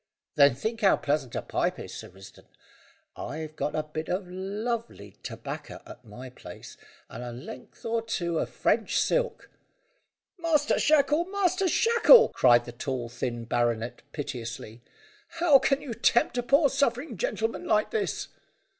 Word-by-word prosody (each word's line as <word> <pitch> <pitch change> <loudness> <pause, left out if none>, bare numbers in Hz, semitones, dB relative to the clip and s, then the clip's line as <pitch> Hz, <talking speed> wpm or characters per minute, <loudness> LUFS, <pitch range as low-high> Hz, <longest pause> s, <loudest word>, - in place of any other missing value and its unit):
Then 140 -3 +5
think 225 - -4
how 195 - +5
pleasant 140 -4 -2
a - - -2
pipe - - -1
is, - - -8
Sir - - -8
Risdon; 95 +1 -15 0.7
I've 155 +1 -6
got 150 0 -2
a 155 - 0
bit 155 +1 -6
o' 185 +3 -1
lovely 200 - -4
tobacco - - -7
at - - -12
my 125 +4 -10
place, - - -11 0.3
and 120 - -8
a 120 - -6
length 125 +1 -11
or 230 0 0
two 175 -7 -2
of - - -2
French - - +1
silk." - - -1 0.9
"Master 310 -3 +2
Shackle! 300 +2 +3
Master 380 -1 0
Shackle!" 470 +5 +6
cried 120 -1 +4
the 120 - -7
tall 120 0 -4
thin 120 -1 -4
baronet 120 0 -1
piteously, 120 -5 -6 0.6
"how 315 -5 +6
can 275 +1 +1
you 255 - -5
tempt 240 +2 +2
a 245 - +1
poor 280 +5 +4
suffering 270 +1 0
gentleman 230 - -2
like 215 0 +2
this?" 440 -2 -2
190 Hz, 150 wpm, -27 LUFS, -, 0.9 s, Shackle